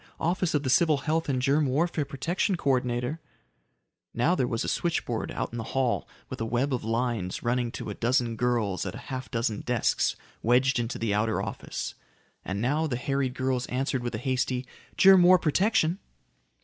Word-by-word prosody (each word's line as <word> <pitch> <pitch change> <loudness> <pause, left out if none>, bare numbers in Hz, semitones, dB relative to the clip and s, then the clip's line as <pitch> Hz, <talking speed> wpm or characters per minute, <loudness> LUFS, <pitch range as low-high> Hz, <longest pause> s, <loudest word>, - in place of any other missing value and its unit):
Office 175 0 0
of 145 - +1
the 130 - -1
Civil 155 +1 +4
Health 160 0 0
and 130 -2 +1
Germ 140 +3 +2
Warfare 150 +3 0
Protection 165 +8 -1
Co 140 -5 +1
ordinator." 125 +3 -1 1.0
Now 135 +9 +3
there 130 -9 +1
was 115 -1 -1
a - - -3
switchboard 160 -9 -1
out - - -3
in 120 - -5
the - - -3
hall 130 -3 +1 0.2
with 130 - -7
a - - 0
web 125 +5 0
of 125 - -2
lines 115 -4 -2
running 120 0 0
to - - -5
a - - -3
dozen 120 -1 +1
girls 115 -5 0
at 90 - -5
a - - -10
half 130 0 -5
dozen 115 -3 -1
desks 125 -2 +1 0.3
wedged 125 +3 +3
into 120 +1 -2
the 110 -3 -1
outer 110 +2 +1
office. - - -5 0.5
And 95 +2 -3
now 145 +8 +1
the 125 -5 -2
harried 135 0 -1
girls 130 -1 -1
answered 130 0 -1
with 120 -1 -3
a - - -2
hasty, 130 +1 -1 0.3
"Germ 190 -1 +8
War 180 +1 +7
Protection." 180 +1 +2
130 Hz, 190 wpm, -27 LUFS, 120-150 Hz, 1.0 s, Germ